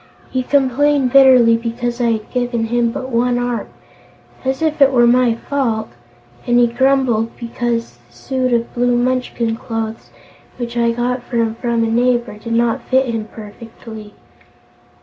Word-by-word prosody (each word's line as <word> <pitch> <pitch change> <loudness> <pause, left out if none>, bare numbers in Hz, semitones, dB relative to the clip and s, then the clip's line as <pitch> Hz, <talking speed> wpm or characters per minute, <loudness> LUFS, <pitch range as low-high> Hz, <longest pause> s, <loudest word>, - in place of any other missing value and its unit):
He 260 - 0
complained 275 0 +1
bitterly 255 -4 +6
because 240 +1 -4
I 235 -1 +2
had 215 -1 -6
given 245 -2 -1
him 235 0 0
but 260 0 -6
one 245 +1 +1
arm 245 -3 -2 0.8
as 265 +3 -2
if 310 -2 -1
it 275 -1 +6
were 240 -2 +4
my 240 -1 +3
fault! 230 - -2 0.6
and 240 0 +3
he 245 - +5
grumbled 240 -2 +1
because 235 - -3
the - - -26
suit 255 - -2
of 235 -1 -1
blue 245 0 +1
Munchkin 245 -2 -1
clothes, 225 -1 -5 0.5
which 240 -1 -5
I 235 -1 +2
got 245 +2 -1
for 245 - -8
him 225 -1 +1
from 235 0 -1
a - - 0
neighbor, 240 0 +1
did 230 +1 -5
not 235 0 +1
fit 260 +1 +1
him 220 -1 -3
perfectly." 220 0 -11
240 Hz, 160 wpm, -17 LUFS, 230-255 Hz, 0.8 s, bitterly